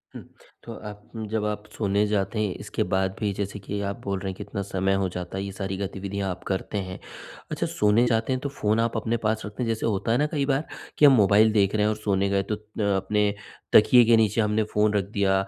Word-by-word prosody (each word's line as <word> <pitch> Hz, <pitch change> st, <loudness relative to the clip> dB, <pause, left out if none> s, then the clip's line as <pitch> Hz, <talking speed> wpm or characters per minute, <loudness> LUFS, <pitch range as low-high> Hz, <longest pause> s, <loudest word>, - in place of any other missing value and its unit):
हुँ। -, -, -7 dB, 0.4 s
तो 115 Hz, -, -8 dB, 0.2 s
आप 105 Hz, 0 st, -11 dB, 0.3 s
जब 110 Hz, -1 st, 0 dB
आप 105 Hz, 0 st, -3 dB
सोने 100 Hz, -1 st, +1 dB
जाते 105 Hz, +1 st, -1 dB
हैं 105 Hz, -3 st, 0 dB
इसके -, -, -2 dB
बाद 95 Hz, 0 st, +1 dB
भी 105 Hz, -3 st, 0 dB
जैसे 100 Hz, +1 st, -4 dB
कि 100 Hz, +1 st, -5 dB
आप 100 Hz, -, -5 dB
बोल 100 Hz, -1 st, -2 dB
रहे 95 Hz, -, -4 dB
हैं -, -, -9 dB
कितना 100 Hz, -, -5 dB
समय 95 Hz, 0 st, 0 dB
हो 95 Hz, -, 0 dB
जाता 90 Hz, +1 st, -6 dB
है, 95 Hz, -, -2 dB
ये 100 Hz, -, -5 dB
सारी 95 Hz, -1 st, -4 dB
गतिविधियाँ 100 Hz, 0 st, -4 dB
आप 90 Hz, -, -8 dB
करते 95 Hz, +2 st, -2 dB
हैं। 95 Hz, -, -7 dB, 0.5 s
अच्छा -, -, -1 dB
सोने 105 Hz, +3 st, +3 dB
जाते 115 Hz, +2 st, +1 dB
हैं 130 Hz, -, -1 dB
तो 140 Hz, -, -3 dB
फ़ोन 110 Hz, -5 st, 0 dB
आप 115 Hz, 0 st, 0 dB
अपने 115 Hz, +2 st, -1 dB
पास 110 Hz, 0 st, +1 dB
रखते 105 Hz, +4 st, -5 dB
हैं? -, -, -2 dB
जैसे 115 Hz, -1 st, -1 dB
होता 110 Hz, 0 st, 0 dB
है 120 Hz, -, +3 dB
ना 145 Hz, -, +2 dB
कई 145 Hz, -4 st, 0 dB
बार 140 Hz, +2 st, 0 dB, 0.3 s
कि 150 Hz, -, +6 dB
हम 140 Hz, -, +8 dB
मोबाइल 105 Hz, 0 st, +5 dB
देख 100 Hz, -1 st, +2 dB
रहे 105 Hz, -, +2 dB
हैं 105 Hz, -, +3 dB
और 110 Hz, -, 0 dB
सोने 100 Hz, -2 st, 0 dB
गए, 100 Hz, 0 st, +1 dB
तो 105 Hz, +2 st, -2 dB
त 105 Hz, 0 st, -18 dB
अ, -, -, +1 dB, 0.3 s
अपने 105 Hz, -1 st, +2 dB, 0.4 s
तकिए 120 Hz, +3 st, +7 dB
के 115 Hz, +1 st, +5 dB
नीचे 110 Hz, 0 st, +2 dB
हमने 105 Hz, +1 st, +1 dB
फ़ोन 105 Hz, 0 st, +3 dB
रख 100 Hz, -2 st, +2 dB
दिया 100 Hz, -2 st, +2 dB
105 Hz, 250 wpm, -25 LUFS, 100-110 Hz, 0.5 s, हम